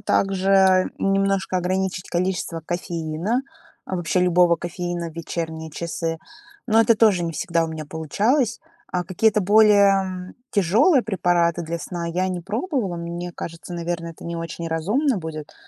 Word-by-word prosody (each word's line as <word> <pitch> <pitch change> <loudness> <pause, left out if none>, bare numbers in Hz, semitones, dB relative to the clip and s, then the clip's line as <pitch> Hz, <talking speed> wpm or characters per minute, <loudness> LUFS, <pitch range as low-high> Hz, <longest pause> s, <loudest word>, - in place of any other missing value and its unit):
также 190 -1 +3
немножко 195 -1 +1
ограничить 185 +1 -1
количество 175 -2 -2
кофеина, 175 +6 -2 0.4
вообще 180 0 0
любого 175 -1 +4
кофеина 175 -1 -4
в - - -17
вечерние 160 -1 -5
часы, 165 +1 -3 0.5
но 225 -1 +4
это 230 +1 +5
тоже 210 -5 +4
не 165 - -3
всегда 170 -2 0
у 160 - -4
меня 160 -1 -6
получалось. 210 - 0 0.3
А 180 - -1
какие-то 210 +4 +2
более 195 -2 +4 0.2
тяжелые 220 - +4
препараты 175 -4 +1
для 170 +1 -4
сна 170 +1 -5
я 180 +3 -1
не 180 -1 -3
пробовала. 215 - -2
Мне 170 +1 -5
кажется, 165 +1 -7
наверное, 170 -1 -3
это - - -14
не 170 0 -4
очень 165 0 -5
разумно 210 - +1
будет. 155 -3 -7
180 Hz, 140 wpm, -23 LUFS, 170-195 Hz, 0.5 s, это